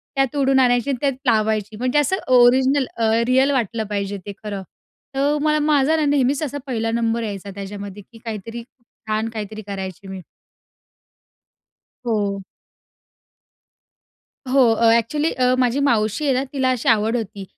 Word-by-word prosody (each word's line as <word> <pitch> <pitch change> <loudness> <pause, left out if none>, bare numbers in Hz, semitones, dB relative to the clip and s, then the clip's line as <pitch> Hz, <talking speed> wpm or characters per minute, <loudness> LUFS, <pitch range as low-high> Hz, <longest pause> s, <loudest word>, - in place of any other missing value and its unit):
त्या 270 - +3
तोडून 270 -2 +2
आणायची, 245 +1 +2
त्यात 275 -2 +1
लावायची. 215 -2 +1
म्हणजे 255 +4 +1
असं 295 +6 +1 0.2
ओरिजिनल 260 +3 +4
अ, 225 -1 +2 0.2
रिअल 265 +2 +3
वाटलं 230 -4 -1
पाहिजे 200 -1 -3
ते 205 - -6
खरं. 205 -2 -4 0.5
तर 285 +2 +1
मला 305 0 +2
माझा 300 0 +3
ना, 310 - +1
नेहमीच 285 0 +1
असा 285 0 -3
1ला 225 -3 -1
नंबर 230 0 0
यायचा 200 -2 -6
त्याच्यामध्ये, 200 0 -7
की 230 - -14
काहीतरी 230 +1 -6 0.4
छान 215 +1 -1
काहीतरी 215 -1 -6
करायची 190 -1 -6
मी. 190 -1 -7 1.8
हो. 205 -4 -1 2.1
हो, 275 - +4
अ, 230 0 +3
ॲक्चुअली 295 +8 +1
अ, 250 0 +2
माझी 250 +2 +2
मावशी 220 +3 +1
आहे 275 - +3
ना 255 +1 0
तिला 265 -2 +1
अशी 250 - 0
आवड 225 +1 +2
होती. 205 -3 -6
235 Hz, 145 wpm, -21 LUFS, 210-270 Hz, 2.1 s, ओरिजिनल